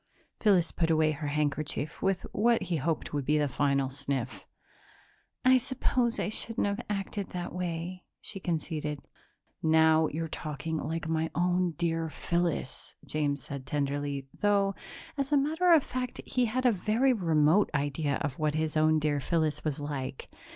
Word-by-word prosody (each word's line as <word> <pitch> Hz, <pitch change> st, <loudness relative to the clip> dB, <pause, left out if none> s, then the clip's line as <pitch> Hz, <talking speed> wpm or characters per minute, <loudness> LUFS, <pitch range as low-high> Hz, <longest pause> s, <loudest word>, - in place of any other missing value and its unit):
Phyllis 185 Hz, -6 st, +4 dB
put 165 Hz, -1 st, 0 dB
away 155 Hz, -1 st, +4 dB
her 150 Hz, 0 st, -4 dB
handkerchief 150 Hz, 0 st, -2 dB
with 195 Hz, -1 st, 0 dB
what 235 Hz, +2 st, +3 dB
he 170 Hz, -, -1 dB
hoped 155 Hz, +2 st, -2 dB
would 145 Hz, -1 st, 0 dB
be 150 Hz, +3 st, +2 dB
a 150 Hz, -1 st, +2 dB
final 140 Hz, -1 st, +1 dB
sniff. 130 Hz, -2 st, -4 dB, 1.0 s
"I 255 Hz, 0 st, +7 dB
suppose 250 Hz, -1 st, 0 dB
I -, -, 0 dB
shouldn't 225 Hz, +1 st, -1 dB
have 200 Hz, +3 st, -1 dB
acted 200 Hz, 0 st, -3 dB
that 175 Hz, -1 st, -5 dB
way," 180 Hz, 0 st, -4 dB
she 195 Hz, -, -7 dB
conceded. 155 Hz, -4 st, -3 dB, 0.5 s
"Now 160 Hz, 0 st, +5 dB
you're 165 Hz, +2 st, -3 dB
talking 155 Hz, 0 st, -4 dB
like 160 Hz, +1 st, -3 dB
my 160 Hz, 0 st, 0 dB
own 180 Hz, 0 st, +2 dB
dear 165 Hz, 0 st, -1 dB
Phyllis," 170 Hz, -5 st, -2 dB
James 145 Hz, -1 st, -1 dB
said 140 Hz, -2 st, -7 dB
tenderly, 145 Hz, -1 st, -1 dB
though, 200 Hz, -1 st, +2 dB, 0.5 s
as 275 Hz, +1 st, -1 dB
a 290 Hz, -, +5 dB
matter 320 Hz, +6 st, +2 dB
of 320 Hz, -4 st, +7 dB
fact, 250 Hz, 0 st, -4 dB
he 250 Hz, -1 st, +1 dB
had 255 Hz, +3 st, -1 dB
a 245 Hz, -, +7 dB
very 225 Hz, +7 st, +2 dB
remote 165 Hz, -1 st, +3 dB
idea 145 Hz, 0 st, 0 dB
of 140 Hz, 0 st, -3 dB
what 155 Hz, -1 st, +1 dB
his 155 Hz, 0 st, -1 dB
own 155 Hz, 0 st, +4 dB
dear 150 Hz, -1 st, +1 dB
Phyllis 155 Hz, 0 st, 0 dB
was 150 Hz, -2 st, -2 dB
like. 140 Hz, -2 st, -4 dB
160 Hz, 160 wpm, -29 LUFS, 145-195 Hz, 1.0 s, I